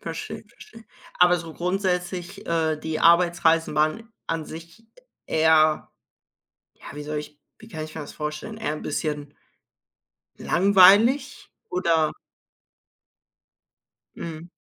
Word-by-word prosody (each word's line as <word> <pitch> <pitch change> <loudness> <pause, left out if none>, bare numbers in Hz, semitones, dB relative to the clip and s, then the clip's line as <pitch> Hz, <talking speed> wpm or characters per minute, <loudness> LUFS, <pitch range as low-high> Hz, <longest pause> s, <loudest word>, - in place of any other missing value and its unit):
Verstehe, - - -7
verstehe. 230 - -16 0.3
Aber 180 0 +5
so 160 -1 -9
grundsätzlich, 180 0 -3
äh, 160 -2 0
die 155 0 -4
Arbeitsreisen 170 -1 +3
waren 155 +10 -1
an 165 -1 -3
sich 165 +7 -12 0.4
eher 155 -1 +3 0.8
ja, - - -17
wie 150 - -7
soll 150 +1 -4
ich 150 0 -10 0.2
wie 225 - -15
kann 155 -8 -6
ich 155 - -11
mir 160 - -5
das 145 - -10
vorstellen? 150 +8 -6
Eher 220 -9 -3
'n - - -8
bisschen 150 -2 -4 1.0
langweilig 200 +9 +4 0.2
oder 170 -4 +1 2.0
Mhm. 165 0 -8
165 Hz, 115 wpm, -24 LUFS, 155-185 Hz, 2.0 s, Aber